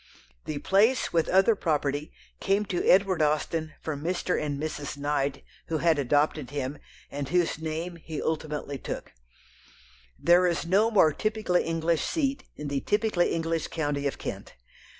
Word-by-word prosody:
The 155 - -3
place, 210 - +2
with 165 -1 +2
other 190 +5 +5
property, 150 -4 -1 0.3
came 200 +2 +1
to 180 -3 -2
Edward 190 -3 +4
Austen 155 +1 0
from 145 -2 -4
Mr. 180 +1 0
and 145 -2 -2
Mrs. 150 -2 -4
Knight, 140 -1 -1 0.2
who 160 - -1
had 160 -1 +2
adopted 145 +1 +1
him, 140 0 -4 0.3
and 140 -1 -4
whose 175 -2 +1
name 160 +2 -4
he 160 -2 -6
ultimately 150 -3 -3
took. - - -6 1.1
There 175 +1 +5
is 170 -1 -1
no 200 +6 +3
more 175 -9 +5
typically 215 -3 0
English 165 -1 0
seat 280 -4 -1
in 150 - -6
the 140 -1 -1
typically 210 -4 +1
English 165 0 -1
county 145 -3 -1
of 135 - -3
Kent. - - -7
160 Hz, 150 wpm, -27 LUFS, 145-180 Hz, 1.1 s, other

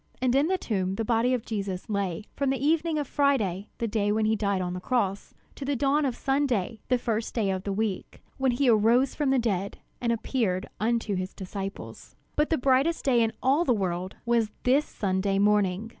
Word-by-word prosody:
And 255 -1 +1
in 280 +3 +3
the 375 +1 +1
tomb 190 - -2
the 225 - -2
body 235 +2 +2
of 250 -3 -1
Jesus 195 -4 -4
lay 200 -3 -2
from 280 -1 0
the 270 - +1
evening 315 +3 +1
of 290 -2 -2
Friday, 220 - +1
the 230 - -1
day 205 -1 0
when 215 +1 +1
he 220 +1 +2
died 200 -2 0
on 180 -1 -2
the 180 - -4
cross, 200 -2 -1 0.2
to - - -8
the 280 +1 -1
dawn 285 +3 +2
of 255 -3 -1
Sunday, 255 -6 0
the 250 - +3
first 230 -2 -2
day 210 -5 +1
of 190 0 -3
the 200 - -1
week, 200 -1 -3 0.2
when 265 -2 +2
he 265 +2 +1
arose 235 +4 +4
from 295 -3 0
the 270 - +3
dead 200 -5 -1 0.2
and 235 -1 +1
appeared 220 -5 -1
unto 225 -1 0
his 185 0 -3
disciples. 195 +1 -7 0.2
But 300 +1 +2
the 320 - +2
brightest 270 +6 +2
day 245 -3 +4
in 225 -1 +2
all 275 +6 +3
the 250 -7 +2
world 185 -2 -2
was 235 -2 +2
this 275 +4 +3
Sunday 195 0 -1
morning. 205 0 +2
225 Hz, 210 wpm, -27 LUFS, 200-265 Hz, 0.2 s, arose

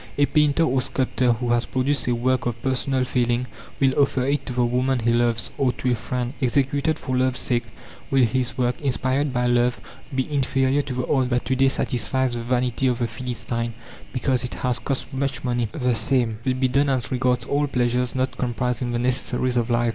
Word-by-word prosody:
A 145 - +5
painter 150 +2 +3
or 130 -4 +2
sculptor 130 -1 +1
who 120 +1 -3
has 120 0 +1
produced 135 +2 0
a 120 - +2
work 125 +1 0
of 120 -1 -3
personal 130 0 0
feeling 120 -1 0 0.3
will 135 -1 +3
offer 135 -2 +2
it 140 +2 -1
to 125 - -3
the 125 0 +2
woman 125 +2 +1
he 115 0 +1
loves, 120 -1 +1
or 130 -3 +2
to 125 - -1
a - - +2
friend. 125 +2 -3
Executed 140 +4 +1
for 130 - -3
love's 130 0 +1
sake, 120 -2 +1 0.4
will 135 -1 +4
his 125 +1 0
work, 125 +1 0
inspired 135 +1 0
by 125 -1 0
love, 120 0 +2 0.4
be 130 -1 0
inferior 135 0 +2
to 140 -3 -5
the 125 0 -1
art 130 -3 +1
that 125 0 0
to 130 - 0
day 135 +1 +4
satisfies 130 -1 0
the 120 - -3
vanity 125 +1 0
of 125 -2 +1
the 120 - 0
philistine, 115 -1 -4 0.4
because 130 -1 0
it 125 - -4
has 125 -2 -1
cost 135 0 -3
much 135 0 -2
money? 120 -2 0
The 125 -5 0
same 115 -1 +2
will 130 -1 0
be 130 0 +1
done 140 +3 +2
as 130 -2 -1
regards 125 -2 +1
all 145 +1 0
pleasures 125 -1 0
not 130 0 -1
comprised 125 0 -1
in 120 -1 -2
the - - 0
necessaries 125 0 0
of 120 0 +1
life. 120 0 +2
125 Hz, 210 wpm, -23 LUFS, 120-130 Hz, 0.4 s, A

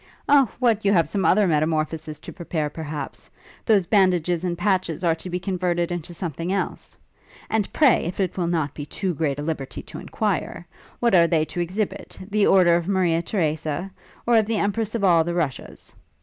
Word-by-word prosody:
'O! 280 -5 +5
what, 230 -4 +2
you 200 - +3
have 170 -5 +3
some 200 -2 -2
other 210 +2 +4
metamorphosis 155 -1 -1
to - - -9
prepare, 160 -4 -3
perhaps? 150 -2 -6 0.3
Those 205 -5 +3
bandages 180 -4 +2
and 175 -1 -2
patches 185 -3 0
are 170 -2 +3
to 165 +3 -8
be 180 0 -2
converted 180 -2 -1
into 175 -1 -5
something 170 0 -4
else? 195 - -4 0.5
And 220 -3 0
pray, 290 -5 +4
if 175 +4 -5
it 185 -3 -1
will 175 -2 -1
not 160 -5 -1
be 145 - -6
too 185 +5 -3
great 145 -3 -1
a 145 - -4
liberty 140 -5 -4
to - - -9
enquire, 190 -4 -3 0.4
what 235 -3 +2
are 170 -2 +6
they 160 -2 +2
to 175 - -6
exhibit? 185 +5 -3
The 210 -1 +3
order 180 -3 +5
of 170 0 -1
Maria 180 -4 +2
Theresa? 160 -1 -2 0.3
or 235 -1 +4
of 215 -2 +3
the 225 -1 0
Empress 210 +2 -1
of 220 - -2
all 170 -4 +5
the 170 +1 -3
Russias? 150 -8 -4
175 Hz, 190 wpm, -23 LUFS, 160-200 Hz, 0.5 s, are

